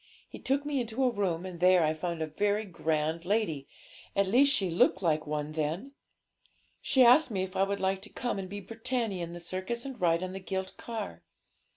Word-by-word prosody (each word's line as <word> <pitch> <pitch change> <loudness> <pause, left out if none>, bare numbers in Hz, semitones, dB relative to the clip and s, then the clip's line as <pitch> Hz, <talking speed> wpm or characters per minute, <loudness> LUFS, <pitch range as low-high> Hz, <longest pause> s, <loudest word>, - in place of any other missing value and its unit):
He - - -10
took 275 +2 0
me 285 -3 0
into 235 +3 -2
a 255 - +3
room, 190 -5 -1
and 180 -2 -7
there 180 -1 +5
I 155 0 +2
found 165 0 -3
a - - 0
very 205 +7 0
grand 160 -2 -1
lady 180 -8 0 0.5
at 200 - +3
least 255 +8 +5
she 190 -9 +1
looked 185 +3 +3
like 155 -3 +1
one 150 0 -2
then. 160 - -2 0.9
She 260 - +4
asked 255 +5 +7
me 190 -4 -1
if 190 0 -7
I 190 - +1
would 200 +1 +1
like 190 0 0
to - - -9
come 240 -4 -3
and 190 -1 -5
be 205 +1 -6
Britannia 225 -3 -3
in 170 0 -6
the 175 - -7
circus 185 +8 -4
and 260 -6 -7
ride 170 0 +3
on 185 0 -4
the 190 - -5
gilt 190 0 -4
car.' 220 - -6
190 Hz, 215 wpm, -30 LUFS, 170-225 Hz, 0.9 s, asked